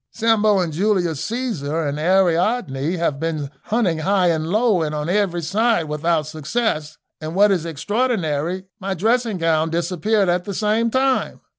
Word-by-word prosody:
Sambo 215 -2 +2
and 175 -4 -1
Julius 175 -4 0
Caesar 175 - -2
and 145 +1 -3
Ariadne 175 - +1
have 160 -5 -1
been 155 -3 -3
hunting 205 -8 0
high 185 +2 +2
and 160 -1 -2
low 215 0 +2
and 155 -1 -2
on 150 +1 -3
every 180 -3 0
side 215 +3 +1
without 155 +1 -1
success, 155 0 -2 0.2
and 155 +2 -5
what 205 +1 +5
is 170 -4 0
extraordinary 180 - -1 0.2
my 195 -1 -3
dressing 225 +2 +1
gown 165 -1 +1
disappeared 180 +5 0
at 175 0 0
the 200 - -5
same 220 +3 +1
time. 260 +2 0
180 Hz, 155 wpm, -21 LUFS, 155-215 Hz, 0.2 s, what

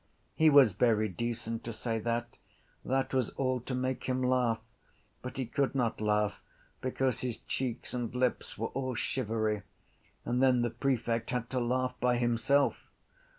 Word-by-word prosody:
He 160 0 +5
was 140 -8 +7
very 110 +1 +3
decent 115 +3 -3
to 115 - -3
say 115 0 -2
that. 120 +1 -2 0.5
That 135 0 0
was 130 -4 +2
all 130 -1 +1
to 125 +2 -4
make 130 0 -2
him 130 0 0
laugh. 125 -3 +2 0.6
But 125 +2 -7
he 130 - -1
could 135 +4 0
not 120 -4 0
laugh 105 -1 +1 0.4
because 130 -1 0
his 125 -3 -3
cheeks 125 -3 -3
and 120 -2 -2
lips 125 0 0
were 115 +1 -2
all 130 -2 -3
shivery: 110 -4 -1 0.6
and 125 +1 0
then 130 -2 +4
the 120 - 0
prefect 120 -4 0
had 125 -1 -2
to 130 - 0
laugh 125 +1 0
by 125 0 +2
himself. 120 +4 +2
125 Hz, 160 wpm, -31 LUFS, 115-130 Hz, 0.6 s, was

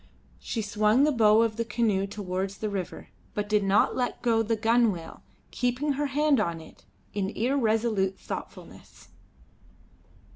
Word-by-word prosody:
She 225 - -3
swung 215 +5 +2
the 300 - +4
bow 220 -3 +5
of 225 -1 -1
the 230 - 0
canoe 220 -4 0
towards 195 -1 -4
the 215 -1 -3
river, 190 -3 -5 0.3
but 210 0 -2
did 210 -1 +2
not 195 +1 +3
let 250 -1 -2
go 230 -2 +3
the 225 +1 0
gunwale, 220 -5 +1 0.3
keeping 250 +4 -1
her 290 +1 -1
hand 290 0 +2
on 170 -5 -1
it 160 - -15 0.3
in 195 -2 -1
irresolute 220 -5 0
thoughtfulness. - - -9
220 Hz, 145 wpm, -27 LUFS, 200-240 Hz, 0.3 s, bow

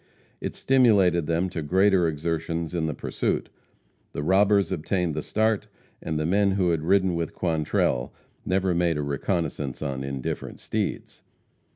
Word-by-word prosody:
It - - -4
stimulated 100 - +3
them 85 +3 +1
to 80 - -3
greater 95 +3 +3
exertions 80 +1 -2
in 85 -2 0
the 75 - -3
pursuit. - - -2 0.6
The 75 - -3
robbers 100 +2 +3
obtained 85 +1 -1
the 75 - -2
start, 110 +3 0 0.3
and 80 - -3
the 75 - -1
men 100 +3 +2
who 95 -3 +2
had 80 -2 0
ridden 95 +2 +2
with 85 -1 -3
Quantrell 75 -7 0 0.3
never 95 0 +1
made 85 -2 +1
a 75 - -1
reconnoissance 70 -1 -2
on 70 -2 -3
indifferent 70 -1 -4
steeds. - - -4
85 Hz, 150 wpm, -25 LUFS, 75-95 Hz, 0.6 s, stimulated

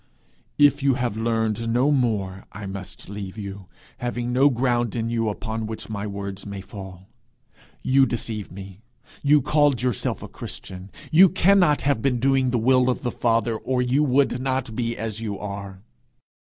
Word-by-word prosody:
'If 145 -1 +5
you 135 -2 +3
have 120 -4 -1
learned 115 0 0
no 130 +5 +3
more 105 -8 0
I 105 +1 -8
must 95 -1 -8
leave 100 0 -7
you, 100 -2 -7 0.3
having 120 0 -2
no 135 +3 +5
ground 120 -3 0
in 115 0 -2
you 115 -2 0
upon 110 +1 -4
which 110 0 -7
my 105 0 -3
words 100 -1 -6
may 100 -1 -6
fall. 95 -1 -10 0.8
You 135 0 +4
deceived 110 -3 -3
me; 95 +1 -10 0.4
you 145 -1 +4
called 145 -4 +2
yourself 125 -6 -1
a - - -6
Christian. 95 +1 -9 0.2
You 180 +4 +8
cannot 185 -4 +4
have 140 -5 +1
been 125 -2 +1
doing 135 0 +2
the 125 - +1
will 130 +2 +3
of 125 - -1
the 120 - -1
Father, 115 -1 +1
or 125 +3 -1
you 130 +4 +2
would 130 -2 +2
not 130 -3 -2
be 115 -1 -2
as 110 -1 -4
you 105 -3 -3
are.' 100 -1 -7
115 Hz, 170 wpm, -24 LUFS, 100-130 Hz, 0.8 s, You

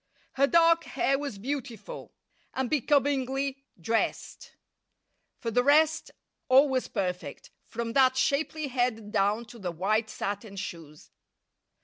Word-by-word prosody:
Her 275 +1 +3
dark 335 +1 +4
hair 275 0 0
was 280 -8 -5
beautiful, 270 - -6 0.4
and 260 -2 -2
becomingly 275 -1 +1 0.2
dressed. 225 +7 -2 0.8
For 230 - -4
the 245 +3 +2
rest, 305 +3 +3 0.4
all 270 +3 +7
was 260 -1 -1
perfect, 180 -2 -4 0.2
from 230 0 -4
that 260 -1 +4
shapely 300 +2 0
head 245 -4 -1
down 210 +2 +1
to 235 +1 -13
the 180 -3 -3
white 215 +6 0
satin 205 0 -5
shoes. 165 -6 -8
250 Hz, 120 wpm, -28 LUFS, 215-280 Hz, 0.8 s, all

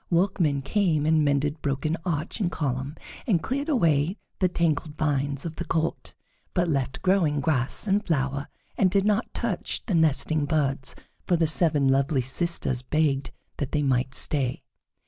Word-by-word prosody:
Workmen 170 -6 +1
came 160 -2 +1
and 155 0 +3
mended 145 +1 0
broken 145 +3 -1
arch 165 +1 -2
and 180 -5 0
column, 135 -1 -3 0.3
and 180 -9 +2
cleared 280 +4 -2
away 165 - +2 0.2
the 185 - +3
tangled 155 -3 -1
vines 140 -2 -1
of 165 -1 -5
the - - -3
court, 165 -1 -2 0.4
but 175 -1 +2
left 135 -4 -2
growing 180 -6 +2
grass 140 - +2
and 205 +1 +1
flower, 140 -4 -1 0.3
and 190 - +5
did 195 +1 +2
not 210 +3 +1
touch 225 -7 -3
the 205 - -2
nesting 155 -1 +2
birds, 140 -3 -1 0.3
for 180 - +3
the 165 - +2
seven 155 -3 +2
lovely 135 +1 +2
sisters 130 -2 0
begged 140 0 0 0.3
that 140 -2 -4
they 150 -1 +1
might 130 -1 0
stay. 130 -3 0
155 Hz, 160 wpm, -26 LUFS, 140-175 Hz, 0.4 s, and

